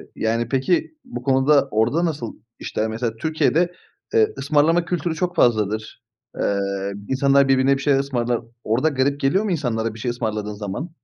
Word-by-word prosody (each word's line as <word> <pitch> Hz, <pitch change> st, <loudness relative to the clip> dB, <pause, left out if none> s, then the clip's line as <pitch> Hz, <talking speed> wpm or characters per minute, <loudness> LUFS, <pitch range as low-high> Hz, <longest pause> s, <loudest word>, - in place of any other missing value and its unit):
yani 115 Hz, +1 st, -1 dB
peki, 170 Hz, -, 0 dB
bu 250 Hz, -, -7 dB
konuda 140 Hz, +1 st, +3 dB
orada 120 Hz, +11 st, +2 dB
nasıl 145 Hz, -8 st, -3 dB, 0.2 s
işler? 110 Hz, -, -2 dB
Mesela, 115 Hz, 0 st, -3 dB
Türkiye'de, 160 Hz, +6 st, +1 dB, 0.4 s
eee, 435 Hz, -1 st, +3 dB
ısmarlama 165 Hz, +3 st, +2 dB
kültürü 170 Hz, -1 st, -2 dB
çok 180 Hz, +2 st, -2 dB
fazladır. 110 Hz, -3 st, +1 dB, 0.4 s
Eee, 100 Hz, 0 st, +1 dB, 0.5 s
insanlar 140 Hz, +1 st, +3 dB
birbirine 135 Hz, +1 st, +3 dB
bir 135 Hz, -, -7 dB
şeyler 140 Hz, -1 st, +3 dB
ısmarlar. 120 Hz, -3 st, -1 dB, 0.2 s
Orada 120 Hz, +8 st, +1 dB
garip 140 Hz, 0 st, 0 dB
geliyor 165 Hz, +10 st, +2 dB
mu 210 Hz, -, -1 dB
insanlara 115 Hz, -8 st, -1 dB
bir 110 Hz, -, -11 dB
şey 120 Hz, +1 st, -1 dB
ısmarladığın 110 Hz, -3 st, -3 dB
zaman? 105 Hz, -, -5 dB
135 Hz, 160 wpm, -22 LUFS, 115-155 Hz, 0.5 s, konuda